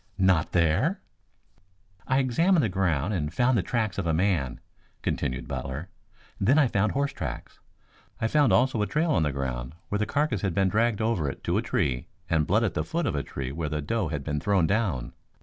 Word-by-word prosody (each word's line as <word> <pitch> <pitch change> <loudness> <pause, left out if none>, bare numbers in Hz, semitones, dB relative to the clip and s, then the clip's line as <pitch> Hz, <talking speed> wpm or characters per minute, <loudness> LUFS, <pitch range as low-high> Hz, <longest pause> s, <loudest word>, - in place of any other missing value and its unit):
"Not 95 -5 +3
there?" 90 - +2 1.1
"I 130 - +2
examined 155 +6 +3
the 110 - +1
ground 90 -2 0
and 75 -5 -1
found 125 +7 +2
the 110 - +3
tracks 110 0 -1
of 90 - -2
a 80 - +2
man," 85 -8 0 0.4
continued 65 0 -2
Butler. 70 +7 -5 0.5
"Then 130 +9 +4
I 150 - +6
found 105 -3 +1
horse 140 +1 0
tracks. - - -6 0.6
I - - 0
found 145 +3 +3
also 125 -3 +3
a 105 - +1
trail 155 +2 +1
on 85 - +3
the 75 -2 +1
ground 65 -1 -4
where 105 - -1
the 110 - 0
carcass 145 -9 0
had 95 -4 -1
been 95 -1 +3
dragged 110 +2 +1
over 95 -11 0
it - - -8
to - - 0
a - - 0
tree 60 -3 -1 0.2
and 80 -2 +2
blood 110 +5 +3
at 110 - 0
the - - -1
foot 170 +1 -2
of - - 0
a 70 - 0
tree 65 -2 -5
where 80 +1 -3
the 75 0 -2
doe 100 +7 -1
had 75 -3 -4
been 75 0 -2
thrown 95 +1 +2
down. 90 - -1
95 Hz, 210 wpm, -27 LUFS, 75-115 Hz, 1.1 s, I